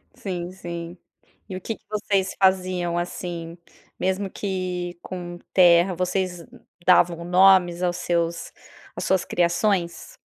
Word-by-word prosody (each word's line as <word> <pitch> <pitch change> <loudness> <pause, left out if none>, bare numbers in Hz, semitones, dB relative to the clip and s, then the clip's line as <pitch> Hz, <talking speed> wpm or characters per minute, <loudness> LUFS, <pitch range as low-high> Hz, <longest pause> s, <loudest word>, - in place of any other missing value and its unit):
sim, 180 -2 -5
sim. 170 -1 -7 0.5
E 185 - -5
o 185 - -6
que 225 - -4
que 220 - -27
vocês 200 -2 0
faziam, 185 -2 +2
assim, 175 -1 -5 0.4
mesmo 190 +1 -1
que 180 -3 -4
com 175 -1 -7 0.2
terra, 175 0 +6
vocês 180 -1 -2 0.4
davam 170 -2 +4
nomes 180 -1 +5
aos 175 -1 0
seus 170 -1 -1 0.4
às - - -4
suas 190 -1 +1
criações? 175 0 0
180 Hz, 120 wpm, -24 LUFS, 175-190 Hz, 0.5 s, terra